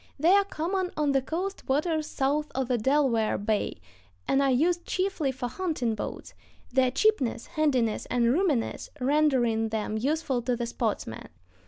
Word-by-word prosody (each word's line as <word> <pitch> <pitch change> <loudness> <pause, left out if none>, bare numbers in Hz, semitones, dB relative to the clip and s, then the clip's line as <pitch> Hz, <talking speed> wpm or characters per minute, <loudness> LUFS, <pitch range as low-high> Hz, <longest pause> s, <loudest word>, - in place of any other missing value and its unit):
They 325 +5 +4
are 400 +1 +6
common 370 +1 -2
on 295 -2 +2
the 270 -1 +2
coast 360 +8 -4
waters 310 +2 +1
south 285 +2 -1
of 265 -1 0
the 250 - +2
Delaware 255 -3 +2
Bay, 205 - -1 0.5
and 270 - +3
are 275 - +3
used 335 +7 +2
chiefly 370 -7 -1
for 255 -1 -4
hunting 280 -6 -2
boats, 215 - -6 0.4
their 260 -1 +4
cheapness, 265 - +1
handiness, 260 -8 0
and 240 -1 +2
roominess 305 -8 0
rendering 255 -5 +2
them 215 0 -2
useful 275 0 0
to 245 +1 0
the 240 0 -2
sportsman. 220 - -3
270 Hz, 155 wpm, -27 LUFS, 240-315 Hz, 0.5 s, are